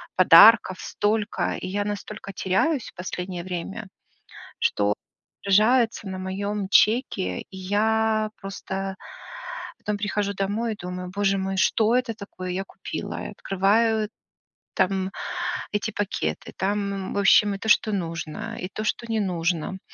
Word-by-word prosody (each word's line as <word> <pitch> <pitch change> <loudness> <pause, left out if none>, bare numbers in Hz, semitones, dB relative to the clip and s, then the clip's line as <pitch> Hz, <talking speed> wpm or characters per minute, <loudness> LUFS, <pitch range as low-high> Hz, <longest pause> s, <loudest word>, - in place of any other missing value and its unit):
подарков 185 +2 +8
столько, 210 +1 -1
и - - -5
я 205 +2 -1
настолько 205 0 -5
теряюсь 230 - 0
в - - -19
последнее 180 -1 -5
время, 185 +4 -5 0.7
что 105 0 +2 0.5
отражается 220 +2 +3
на 190 0 -5
моем 195 +1 -3
чеке, 210 - +3
и 190 - -14
я 215 +3 +1
просто 195 -1 -5 0.8
потом 210 -1 -3
прихожу 205 0 -1
домой 210 +4 -1
и - - -14
думаю, 180 0 -6
боже 195 -1 +2
мой, 190 0 -2
что 220 +4 +3
это 250 -2 0
такое 185 -3 -7
я 185 +2 -2
купила, - - -6
и - - -6
открываю 215 +3 +2 0.7
там 190 0 +1 0.6
эти 210 +1 -1
пакеты, 205 -1 -3
там, 200 +2 0
м, 195 -1 -4
в - - -1
общем 200 +1 +5
и - - -5
то, 220 - -6
что 215 - +4
нужно, 170 +4 -4
и 180 - -4
то, 215 +2 -5
что 235 +2 -1
не 225 - +1
нужно, 175 -2 -1
200 Hz, 140 wpm, -25 LUFS, 185-215 Hz, 0.8 s, подарков